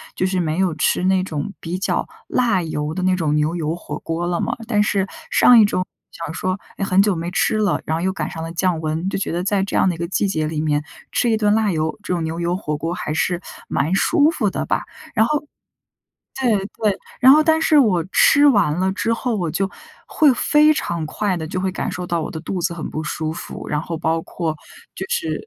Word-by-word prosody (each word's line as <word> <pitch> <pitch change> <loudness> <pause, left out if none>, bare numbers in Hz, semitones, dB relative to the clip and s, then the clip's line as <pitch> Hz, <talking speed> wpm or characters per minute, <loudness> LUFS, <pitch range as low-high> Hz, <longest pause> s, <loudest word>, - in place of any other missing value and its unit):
就 185 - 0
是 185 0 0
没 160 -2 -1
有 185 -3 +1
吃 155 - +1
那 190 0 +3
种 160 +1 -4
比 175 +2 -4
较 195 - -1 0.2
辣 230 -7 +2
油 150 -1 -3
的 185 - -3
那 185 0 +3
种 155 -4 0
牛 150 +2 +1
油 160 -1 -2
火 175 - -7
锅 165 +1 -3
了 175 0 -1
嘛。 235 - -1
但 210 -3 +2
是 200 -2 +1 0.2
上 245 -2 +7
一 215 - +7
周 185 -2 0 0.3
想 165 -1 -6
说 185 +3 -2 0.2
也 - - -2
很 190 0 +4
久 205 0 +2
没 170 +1 -3
吃 205 - +1
了， 210 -1 +1
然 160 - -1
后 - - -3
又 190 +2 +1
赶 155 -5 -3
上 160 - -6
了 165 0 -5
降 175 -1 0
温， 160 +3 -2
就 - - -2
觉 - - -2
得 175 +1 -1
在 195 +1 +1
这 195 - -4
样 - - +4
的 175 - -1
一 - - -11
个 170 +1 -3
季 190 +3 0
节 155 -5 -1
里 155 -1 -2
面 150 -1 +1 0.3
吃 240 - +1
一 225 - +3
顿 210 -1 +2
辣 215 -2 +2
油 155 0 -1
这 - - -2
种 170 -2 -1
牛 160 +1 -3
油 175 +1 0
火 150 -6 -3
锅 165 +3 -3
还 150 - -4
是 175 +2 0 0.3
蛮 150 +6 0
舒 295 - +4
服 225 -11 0
的 - - -3
吧。 - - 0 0.3
然 220 - +4
后 295 +4 0 1.0
对 240 -5 +3 0.3
对， 205 -3 +2 0.2
然 260 +1 +8
后 305 +2 +6
但 320 0 +3
是 310 -1 +4
我 205 -11 +4
吃 285 +7 +5
完 205 - +3
了 190 0 +2
之 230 +3 -1
后， 230 0 -1
我 175 -5 -1
就 195 +4 -1 0.4
会 300 -4 +4
非 300 +4 +4
常 170 - -2
快 185 +5 -1
的 160 -2 -4
就 185 +3 -3
会 190 0 0
感 185 - -3
受 180 - -5
到 170 -2 -1
我 - - -4
的 160 - -6
肚 180 +3 -4
子 170 +1 0
很 170 -2 -5
不 155 - -4
舒 155 0 -3
服， 165 - -8
然 150 - 0
后 165 0 -4
包 165 0 0
括 160 -2 -3 0.4
就 - - -5
是 480 -2 -2
185 Hz, 265 characters per minute, -20 LUFS, 165-210 Hz, 1.0 s, 然